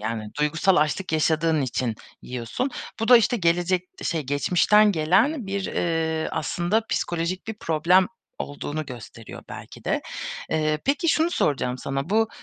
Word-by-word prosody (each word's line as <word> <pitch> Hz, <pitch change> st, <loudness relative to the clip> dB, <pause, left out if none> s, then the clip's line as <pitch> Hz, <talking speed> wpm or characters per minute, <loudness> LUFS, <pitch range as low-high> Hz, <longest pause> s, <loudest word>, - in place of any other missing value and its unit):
yani, 110 Hz, -1 st, -4 dB
duygusal 160 Hz, +5 st, +2 dB
açlık 155 Hz, +4 st, 0 dB
yaşadığın 160 Hz, 0 st, +2 dB
için 125 Hz, -2 st, -1 dB, 0.3 s
yiyorsun. 125 Hz, -, -3 dB, 0.3 s
Bu 225 Hz, -, -1 dB
da, 250 Hz, -, +10 dB
işte, 235 Hz, +1 st, +3 dB
gelecek 175 Hz, 0 st, +1 dB
şey 165 Hz, -3 st, -1 dB
geçmişten 180 Hz, +9 st, +3 dB
gelen 195 Hz, -, +2 dB
bir, 195 Hz, 0 st, -2 dB
eee, 160 Hz, -1 st, -1 dB
aslında 175 Hz, +7 st, 0 dB
psikolojik 175 Hz, +3 st, -2 dB
bir 220 Hz, -, -4 dB
problem 170 Hz, +4 st, +3 dB, 0.3 s
olduğunu 145 Hz, +1 st, -4 dB
gösteriyor 115 Hz, -2 st, -10 dB
belki -, -, -10 dB
de. -, -, 0 dB, 0.5 s
Eee, 155 Hz, -1 st, +1 dB
peki, 290 Hz, +4 st, +1 dB
şunu 320 Hz, +2 st, +3 dB
soracağım 130 Hz, -, 0 dB
sana, 135 Hz, +5 st, -3 dB
bu, 225 Hz, +1 st, +3 dB
165 Hz, 140 wpm, -24 LUFS, 150-195 Hz, 0.5 s, da